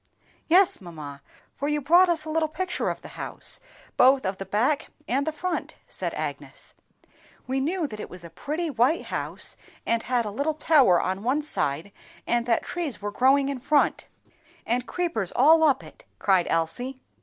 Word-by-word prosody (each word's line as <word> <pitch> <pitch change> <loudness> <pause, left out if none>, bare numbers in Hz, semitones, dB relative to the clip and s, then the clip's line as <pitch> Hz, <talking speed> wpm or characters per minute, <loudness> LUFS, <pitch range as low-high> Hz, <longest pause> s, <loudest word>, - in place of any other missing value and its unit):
"Yes, 360 - +4
mamma, 150 -6 -9 0.3
for 285 - -3
you 295 0 +1
brought 345 +6 +5
us 320 -2 0
little 315 0 0
pictures 355 +3 -2
of - - -5
the - - -9
house, - - -5 0.4
both 260 -1 +5
of 190 0 -1
the 195 - -7
back 245 +10 +1 0.2
and 275 +4 0
the - - +1
front," 340 +3 -3
said - - -4
Agnes. - - -5 0.7
"We 265 +1 -1
knew 330 +5 0
that 215 -7 -6
it - - -6
was 180 -1 -9
a 170 - -10
pretty 320 +4 -3
white 260 +6 +2
house, - - -3 0.3
and 230 0 +1
had 245 -1 0
a 210 - -3
little 285 +8 -1
tower 280 - +5
on 190 +1 -2
one 265 +7 0
side, 160 - -1 0.3
and 240 0 0
that 230 - +2
trees 335 -8 -3
were 205 0 -4
growing 270 +5 +4
in 275 -2 -3
front, 290 +3 +2 0.6
and 245 +2 -1
creepers 330 - -1
all 320 +2 +6
up 290 -4 +3
it!" - - -14
cried 190 -3 +2
Elsie. 245 +12 -1
265 Hz, 180 wpm, -26 LUFS, 210-310 Hz, 0.7 s, all